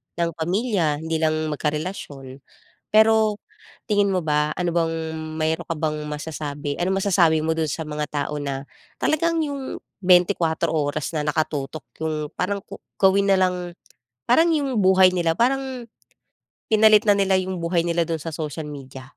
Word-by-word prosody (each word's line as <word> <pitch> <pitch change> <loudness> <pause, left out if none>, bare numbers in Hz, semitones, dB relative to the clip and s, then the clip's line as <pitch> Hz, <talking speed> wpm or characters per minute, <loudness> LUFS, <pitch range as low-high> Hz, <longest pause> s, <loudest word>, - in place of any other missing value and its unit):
ng 170 0 0
pamilya, 175 -4 0
hindi 160 0 -1
lang 155 -1 +2 0.2
magkarelasyon. 150 -3 -4 0.5
Pero, 220 -1 +4 0.5
tingin 205 -2 +2
mo 185 - +1
ba, 150 0 +1
ano 180 -1 -1
bang 165 -1 +1 0.5
mayroon 160 +2 0
ka 165 - -1
bang 155 -1 -2
masasabi? 150 -1 -5
Anong 190 +2 +1
masasabi 170 -5 +3
mo 160 +1 0
do'n 160 -1 0
sa 160 - -3
mga 150 0 -3
tao 145 0 -2
na 140 -1 -4 0.3
talagang 330 +2 +1
'yong 280 -2 -5 0.2
24 175 -3 +3
oras 150 -2 -1
na 150 - -1
nakatutok 150 -1 -2 0.2
'yong, 155 -2 -2
parang 200 +2 -1
ko - - -11 0.2
gawin 195 +1 +4
na - - +5
lang 180 -1 0 0.5
parang, 325 +8 +4
'yong 275 -8 0
buhay 185 -1 +5
nila 170 -2 0
parang, 260 0 0 0.8
pinalit 215 -1 +6
na 200 - +5
nila 195 -1 +2
ng 185 0 -4
buhay 170 0 0
nila 170 0 0
do'n 165 -1 -3
sa 165 - -5
social 155 0 -5
media? 135 -2 -10
170 Hz, 155 wpm, -23 LUFS, 150-200 Hz, 0.8 s, pinalit